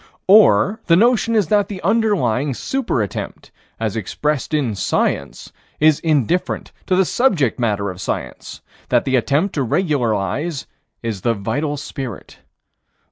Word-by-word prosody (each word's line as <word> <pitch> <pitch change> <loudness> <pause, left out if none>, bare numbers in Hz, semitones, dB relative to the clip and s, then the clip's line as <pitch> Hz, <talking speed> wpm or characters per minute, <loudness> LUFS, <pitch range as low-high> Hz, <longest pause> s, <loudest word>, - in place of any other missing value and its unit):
Or 200 - +5
the 165 - +5
notion 230 +2 +3
is 210 -3 +3
that 205 -2 +3
the 200 -3 -6
underlying 170 - +1
super 245 - -1
attempt, 100 - -7 0.3
as 110 -1 -2
expressed 140 +6 -2
in 140 -8 0
Science, 95 - -2 0.3
is 155 -1 +4
indifferent 155 - 0 0.2
to 185 - +2
the 190 0 +3
subject 170 - +1
matter 100 -4 0
of 90 +1 -10
Science: - - -5 0.3
that - - +2
the 130 - +1
attempt 145 - +1
to 145 - -1
regularize 135 - -1 0.4
is 110 -5 -3
the 115 +3 +1
vital 145 +9 -2
spirit. 135 -6 -7
145 Hz, 135 wpm, -19 LUFS, 115-190 Hz, 0.4 s, Or